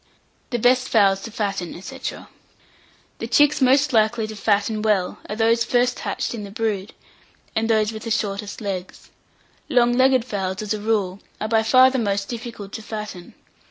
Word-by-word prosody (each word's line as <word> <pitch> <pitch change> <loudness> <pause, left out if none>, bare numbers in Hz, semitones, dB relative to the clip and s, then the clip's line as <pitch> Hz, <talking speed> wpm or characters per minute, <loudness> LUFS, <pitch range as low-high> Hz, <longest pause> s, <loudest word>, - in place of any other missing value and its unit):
THE 240 - -1
BEST 250 +2 +3
FOWLS 195 -3 +4
TO 225 - -7
FATTEN, 200 -6 -3
&c. 190 - -9 1.2
The - - -4
chicks 295 0 +4
most 265 +2 +4
likely 220 0 +2
to 215 0 -7
fatten 210 +1 0
well 210 -4 0
are 210 - -3
those 230 +1 +3
first 245 +1 +1
hatched - - -3
in 220 -3 -5
the 200 - -7
brood, 210 -1 -3 0.6
and 225 +1 0
those 215 -1 +2
with 220 -1 -7
the - - -3
shortest 205 0 -2
legs. 190 -3 -6 0.6
Long 240 -1 +4
legged 255 -1 +4
fowls, 195 -3 -3
as 210 - -1
a 210 - -4
rule, 205 -3 0 0.2
are 215 - -2
by 220 0 +3
far 255 +3 +6
the 260 - 0
most 200 -3 -1
difficult 230 -4 -7
to 220 - -6
fatten. 210 -5 -7
220 Hz, 175 wpm, -22 LUFS, 200-240 Hz, 1.2 s, far